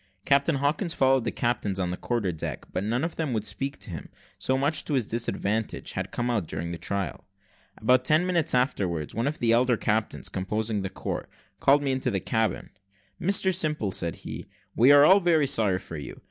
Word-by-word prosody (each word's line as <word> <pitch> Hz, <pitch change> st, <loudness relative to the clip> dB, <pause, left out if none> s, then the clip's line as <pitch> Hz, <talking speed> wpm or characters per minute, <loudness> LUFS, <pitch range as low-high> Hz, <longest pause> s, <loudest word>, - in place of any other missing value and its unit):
Captain 140 Hz, +3 st, +3 dB
Hawkins 150 Hz, +6 st, 0 dB
followed 135 Hz, -2 st, +3 dB
the -, -, 0 dB
captains 105 Hz, -5 st, -1 dB
on 90 Hz, -1 st, -1 dB
the -, -, -2 dB
quarter 110 Hz, -3 st, -1 dB
deck, 80 Hz, -, -5 dB
but 90 Hz, -, -1 dB
none 120 Hz, +6 st, 0 dB
of 165 Hz, 0 st, -3 dB
them 155 Hz, -6 st, -1 dB
would 110 Hz, -2 st, -1 dB
speak 135 Hz, +4 st, -3 dB
to 100 Hz, -, -8 dB
him 80 Hz, -, -7 dB, 0.3 s
so 130 Hz, -, +1 dB
much 145 Hz, +4 st, +1 dB
to 150 Hz, -, -1 dB
his 125 Hz, -4 st, +1 dB
disadvantage 110 Hz, -1 st, -2 dB
had -, -, -4 dB
come 120 Hz, -, -2 dB
out 110 Hz, -9 st, 0 dB
during 80 Hz, +2 st, -4 dB
the 85 Hz, -, -6 dB
trial. 100 Hz, -6 st, -3 dB, 0.5 s
About 125 Hz, +3 st, +3 dB
ten 155 Hz, +6 st, +3 dB
minutes 170 Hz, -7 st, +1 dB
afterwards, 90 Hz, -, 0 dB
one 115 Hz, +4 st, -1 dB
of 150 Hz, -, -2 dB
the 115 Hz, -1 st, +2 dB
elder 120 Hz, +1 st, +3 dB
captains 110 Hz, -2 st, -1 dB
composing 105 Hz, +3 st, -2 dB
the 95 Hz, -, -3 dB
court -, -, -5 dB, 0.3 s
called 145 Hz, +1 st, +4 dB
me 135 Hz, -, +1 dB
into 130 Hz, -1 st, 0 dB
the 100 Hz, -4 st, -1 dB
cabin. 110 Hz, +3 st, -1 dB, 0.5 s
"Mr 190 Hz, 0 st, +2 dB
Simple," 150 Hz, -, -1 dB
said 85 Hz, -4 st, -2 dB
he, -, -, -8 dB, 0.3 s
"we 125 Hz, +5 st, +6 dB
are 145 Hz, 0 st, +8 dB
all 190 Hz, +5 st, +7 dB
very 170 Hz, -5 st, +3 dB
sorry 105 Hz, -8 st, +2 dB
for 85 Hz, -3 st, -8 dB
you. 70 Hz, -, -8 dB
120 Hz, 205 wpm, -26 LUFS, 100-140 Hz, 0.5 s, are